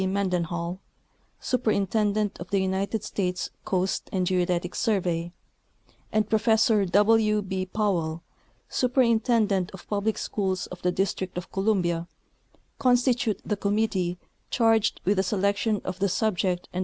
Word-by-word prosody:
Mendenhall, 180 -2 -1 0.6
Superintendent 210 -3 0
of 175 - -8
the 200 - +1
United 190 +3 -1
States 180 -4 -2
Coast 185 0 -1
and 185 -2 0
Geodetic 180 -1 0
Survey, 175 -5 0 0.8
and 215 -1 +1
Professor 220 -1 +3
W. 210 +3 +3
B. 190 -1 -3
Powell, 175 -6 -1 0.4
Superintendent 230 -6 +2
of 185 - -14
Public 210 +1 -1
Schools 190 -3 -2
of 180 - -10
the 180 - +1
District 190 -1 -2
of 180 - -6
Columbia, 180 -4 0 0.7
constitute 245 -2 +2
the 210 - 0
com 200 +1 -1
mittee 185 -5 0 0.3
charged 225 -2 +2
with 200 +1 +2
the 190 +2 +1
award 200 +2 +1
of 185 - -4
the 200 - +2
prizes - - -1
for 220 - +1
1893. 180 -3 -1
200 Hz, 130 wpm, -26 LUFS, 180-215 Hz, 0.8 s, Professor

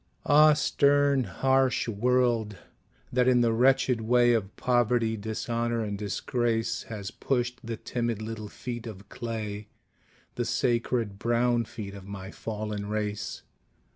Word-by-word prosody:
Ah, 150 +1 +7
stern 145 -2 +3
harsh 130 +8 +1
world, 115 -1 +1 0.6
that 125 0 +3
in 125 -1 +5
the 115 -1 +3
wretched 125 0 +3
way 120 +1 +4
Of 105 -4 -1
poverty, 120 -2 +1
dishonor 115 +2 -2
and 105 -1 -3
disgrace, 115 +3 -1
Has 105 -4 -5
pushed 125 -1 -1
the 115 -1 -4
timid 120 -2 -2
little 110 -1 -6
feet 120 +1 -6
of 100 -2 -10
clay, 110 -3 -5 0.7
The - - -2
sacred 115 -4 0
brown 120 +1 +2
feet 100 -2 -8
of 100 -1 -10
my 100 -1 -7
fallen 105 -2 -5
race! 105 -1 -3
115 Hz, 130 wpm, -28 LUFS, 105-125 Hz, 0.7 s, Ah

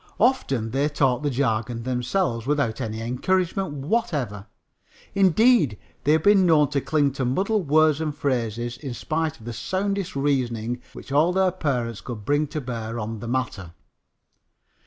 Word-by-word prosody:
Often 135 - +1
they 140 +3 +1
talk 135 -4 +1
the 145 - 0
jargon 115 -3 -1
themselves 125 0 -1
without 140 -6 0
any 110 0 -4
encouragement 180 +9 0
whatever. 145 - -1 0.7
Indeed, 195 - +4 0.3
they 150 - +5
have 160 0 +2
been 205 0 +6
known 155 -5 +4
to 140 -2 0
cling 145 -1 +1
to 135 0 -3
muddled 190 - 0
words 155 +1 +4
and 155 -2 -2
phrases 120 -4 -2
in 135 -3 -6
spite 155 +4 -2
of 110 - -15
the 120 - -5
soundest 195 - -2
reasoning 125 -4 -1
which - - -11
all 155 +5 +4
their 190 0 +2
parents 125 - -2
could 110 -4 -7
bring 145 +1 +2
to 155 +2 -4
bear 115 -4 -5
on 110 0 -4
the 115 - -7
matter. 115 -9 -3
140 Hz, 155 wpm, -24 LUFS, 120-160 Hz, 0.7 s, been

